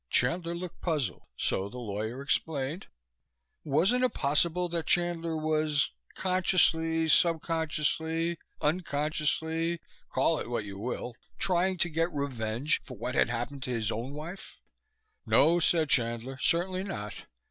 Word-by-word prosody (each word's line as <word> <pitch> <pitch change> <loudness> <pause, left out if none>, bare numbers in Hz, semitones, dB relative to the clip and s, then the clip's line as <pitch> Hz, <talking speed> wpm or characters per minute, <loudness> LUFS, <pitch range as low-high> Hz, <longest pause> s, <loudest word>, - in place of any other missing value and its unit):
Chandler 170 +6 +2
looked 175 0 -7
puzzled, 150 - -2
so 95 +1 0
the 125 - -9
lawyer 110 +3 -4
explained. 145 +2 -1 0.8
Wasn't 190 - +3
it 255 - +1
possible 165 +5 +2
that 170 -1 -2
Chandler 170 -2 +1
was 155 -2 +1 0.2
consciously, 165 -3 +2
subconsciously, 160 0 +1 0.2
unconsciously, 160 +1 0 0.3
call 165 - +2
it - - -5
what 115 -3 -2
you 100 -1 -7
will 120 +2 -4 0.2
trying 185 0 +2
to 175 - +3
get 165 +2 0
revenge 130 -2 0
for 125 - -10
what 120 +4 -3
had - - +3
happened 120 +4 -3
to 130 - -4
his 115 -3 0
own 120 +5 -4
wife? 170 +6 -8 0.7
No, 170 +2 +5
said 165 -1 +3
Chandler, 120 +2 +1
certainly 185 +5 +1
not! 105 - -5
155 Hz, 130 wpm, -29 LUFS, 130-170 Hz, 0.8 s, No